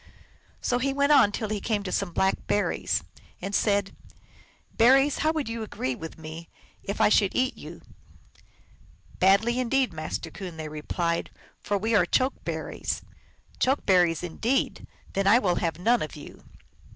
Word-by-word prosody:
So 245 Hz, -, 0 dB
he 270 Hz, +2 st, 0 dB
went 280 Hz, +1 st, +2 dB
on 210 Hz, -8 st, +6 dB
till 215 Hz, +1 st, -3 dB
he 210 Hz, -2 st, -2 dB
came 210 Hz, -3 st, -1 dB
to 185 Hz, -, -4 dB
some 195 Hz, -3 st, -1 dB
Black 190 Hz, +3 st, 0 dB
Berries, 205 Hz, -, 0 dB, 0.4 s
and 200 Hz, -, -5 dB
said, 200 Hz, -1 st, +1 dB, 0.4 s
" -, -, -30 dB
Berries, 270 Hz, +5 st, +5 dB
how 310 Hz, -, +2 dB
would 310 Hz, -5 st, -2 dB
you 230 Hz, 0 st, -4 dB
agree 130 Hz, -11 st, -3 dB
with 160 Hz, +5 st, -8 dB
me 160 Hz, +1 st, -9 dB, 0.3 s
if 200 Hz, -, -5 dB
I -, -, +5 dB
should 200 Hz, -2 st, +3 dB
eat 255 Hz, +1 st, +1 dB
you?" -, -, -11 dB, 1.4 s
"Badly 205 Hz, +6 st, +4 dB
indeed, 255 Hz, -2 st, +1 dB
Master 155 Hz, +1 st, -5 dB
Coon," 180 Hz, -4 st, -8 dB
they 155 Hz, -1 st, -5 dB
replied, 170 Hz, +3 st, -2 dB, 0.2 s
" -, -, -31 dB
for 205 Hz, -, -1 dB
we 220 Hz, +3 st, -1 dB
are 180 Hz, -5 st, +4 dB
Choke 260 Hz, +7 st, 0 dB
berries." -, -, -4 dB, 0.3 s
" -, -, -31 dB
Choke 265 Hz, +3 st, +1 dB
berries, 175 Hz, -3 st, +3 dB
indeed! 225 Hz, +10 st, -1 dB, 0.3 s
Then 195 Hz, 0 st, 0 dB
I 210 Hz, +4 st, +7 dB
will 185 Hz, -7 st, +1 dB
have 165 Hz, -2 st, -1 dB
none 230 Hz, +7 st, +2 dB
of 155 Hz, -, -5 dB
you." 145 Hz, -, -12 dB
200 Hz, 175 wpm, -26 LUFS, 175-245 Hz, 1.4 s, I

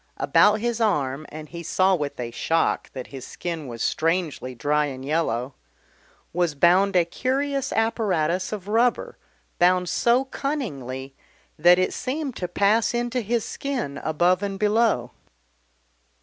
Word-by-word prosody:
About 205 Hz, +1 st, +4 dB
his 235 Hz, 0 st, -1 dB
arm 150 Hz, -8 st, 0 dB
and 155 Hz, 0 st, -9 dB
he 170 Hz, -1 st, -7 dB
saw 185 Hz, +3 st, +2 dB
with 145 Hz, -7 st, -2 dB
a 120 Hz, -1 st, -4 dB
shock 165 Hz, +7 st, 0 dB
that 130 Hz, -2 st, -6 dB
his 135 Hz, -2 st, -7 dB
skin 165 Hz, -4 st, -5 dB
was 115 Hz, -2 st, -5 dB
strangely 160 Hz, -6 st, -1 dB
dry 150 Hz, +5 st, +1 dB
and 130 Hz, -1 st, -7 dB
yellow 140 Hz, -4 st, -1 dB, 0.8 s
was 175 Hz, -3 st, 0 dB
bound 185 Hz, +6 st, +4 dB
a 175 Hz, -2 st, +4 dB
curious 270 Hz, +8 st, -1 dB
apparatus 190 Hz, -6 st, 0 dB
of 205 Hz, -3 st, -6 dB
rubber, 235 Hz, +3 st, +1 dB, 0.4 s
bound 180 Hz, 0 st, +4 dB
so 245 Hz, +3 st, +2 dB
cunningly 140 Hz, -, -4 dB, 0.5 s
that 175 Hz, +3 st, +7 dB
it 185 Hz, -, +1 dB
seemed 275 Hz, 0 st, -3 dB
to 180 Hz, -, -3 dB
pass 205 Hz, +6 st, +2 dB
into 240 Hz, +1 st, -1 dB
his 230 Hz, +1 st, -1 dB
skin 240 Hz, -, -4 dB
above 175 Hz, +4 st, +1 dB
and 200 Hz, -1 st, -3 dB
below. 210 Hz, -, +2 dB
180 Hz, 140 wpm, -24 LUFS, 150-225 Hz, 0.8 s, that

